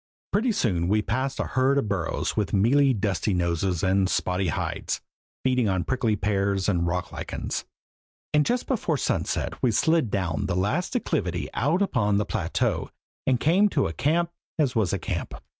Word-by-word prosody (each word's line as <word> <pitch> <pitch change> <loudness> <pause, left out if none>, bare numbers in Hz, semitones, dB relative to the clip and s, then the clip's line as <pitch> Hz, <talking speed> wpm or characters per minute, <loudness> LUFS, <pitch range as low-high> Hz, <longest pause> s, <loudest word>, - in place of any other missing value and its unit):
Pretty 230 +4 +2
soon 90 - 0
we 105 +2 +2
passed 130 +7 -2
a - - +2
herd 130 +2 +2
of 135 - +1
burros 95 -5 -1
with 100 -6 -1
mealy, 135 +8 +4
dusty 100 -3 0
noses 85 +1 0
and 95 0 +2
spotty 90 0 0
hides, 80 - -2 0.4
feeding 125 -4 +2
on 95 -2 0
prickly 120 -5 0
pears 100 -1 0
and 85 -4 +1
rock 90 +1 -2
lichens; - - -4 0.7
and 150 0 +5
just 245 +9 0
before 200 - 0
sunset - - -1
we 125 - +3
slid 160 +3 +2
down 90 -7 -1
the 95 - -1
last 105 - 0
declivity 90 - -1
out 160 - +2
upon 105 - +1
the 105 - +1
plateau - - -1 0.4
and 130 -2 +3
came 190 +7 +4
to 140 -7 +1
a 80 - -2
camp 165 - +1 0.3
as 140 -6 +1
was 110 -6 +2
a - - 0
camp! - - -4
105 Hz, 175 wpm, -26 LUFS, 95-140 Hz, 0.7 s, and